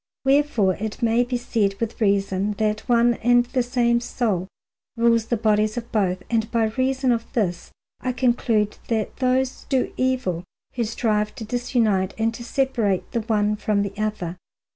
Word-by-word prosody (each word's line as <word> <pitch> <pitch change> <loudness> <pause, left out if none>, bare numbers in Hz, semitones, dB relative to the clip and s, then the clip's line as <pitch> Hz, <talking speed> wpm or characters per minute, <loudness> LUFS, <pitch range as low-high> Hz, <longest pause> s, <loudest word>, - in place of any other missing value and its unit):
Wherefore 270 -8 +3
it 220 +3 -5
may 230 +1 +3
be 245 0 -2
said 215 -5 0
with 230 0 -4
reason 200 0 +1
that 215 +1 -2
one 240 0 +4
and 245 +1 +4
the 255 +1 0
same 240 -1 +2
soul 215 -6 -1 0.5
rules 230 -1 +3
the 235 - 0
bodies 215 0 +1
of 235 0 -5
both, 185 -4 0
and 225 -1 0
by 225 -2 +1
reason 260 +1 +1
of 230 -1 -2
this 180 -7 -1 0.3
I 255 - -1
conclude 235 -4 +1
that 220 -3 -2
those 255 0 0
do 260 -2 0
evil 250 -10 0 0.3
who 240 -2 -1
strive 210 -1 -1
to 220 - -6
disunite 220 -5 0
and 225 +1 +1
to 235 - -8
separate 235 -7 0
the 235 - -1
one 210 -1 +1
from 210 -1 0
the 200 -1 -4
other. 210 -5 -3
225 Hz, 165 wpm, -23 LUFS, 210-245 Hz, 0.5 s, one